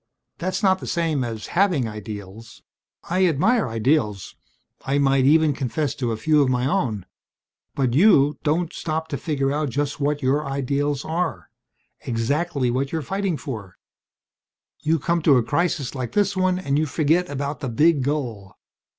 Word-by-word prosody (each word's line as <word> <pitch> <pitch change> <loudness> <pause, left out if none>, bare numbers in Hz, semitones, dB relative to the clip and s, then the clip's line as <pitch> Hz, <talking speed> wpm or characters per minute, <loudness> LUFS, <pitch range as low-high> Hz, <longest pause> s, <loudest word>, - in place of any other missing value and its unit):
That's 185 +3 -2
not 190 -1 +4
the - - -8
same 165 -6 0
as 115 -3 -5
having 175 - +2
ideals. 105 0 -9 0.4
I 185 +2 +2
admire 170 - +2
ideals 115 - 0 0.5
I 135 +1 0
might 135 -2 +3
even 155 +1 +4
confess 135 +2 -2
to 120 -3 -2
a 110 - -2
few 150 +5 +3
of 135 - +2
my 125 0 +1
own. 125 - -1 0.7
But 130 -4 0
you 150 - +4
don't 165 +2 0
stop 160 0 -3
to 140 - -3
figure 140 -1 -1
out 150 0 -1
just 145 +4 -2
what 145 0 -1
your 140 +4 +2
ideals 140 +1 -1
are 160 - -3 0.5
exactly 130 +3 -1
what 135 +3 -1
you're 160 -2 -2
fighting 195 +1 -2
for. 110 - -7 1.0
"You 160 +2 +2
come 170 +3 0
to 145 -4 +5
a 120 - +2
crisis 155 -1 -1
like 130 -4 -5
this 200 -1 +1
one 185 -1 +1
and 145 -6 0
you 155 - 0
forget 165 +4 +1
about 145 +1 -4
the 135 -4 -4
big 150 +5 +3
goal. 120 -9 -3
145 Hz, 165 wpm, -23 LUFS, 125-165 Hz, 1.0 s, to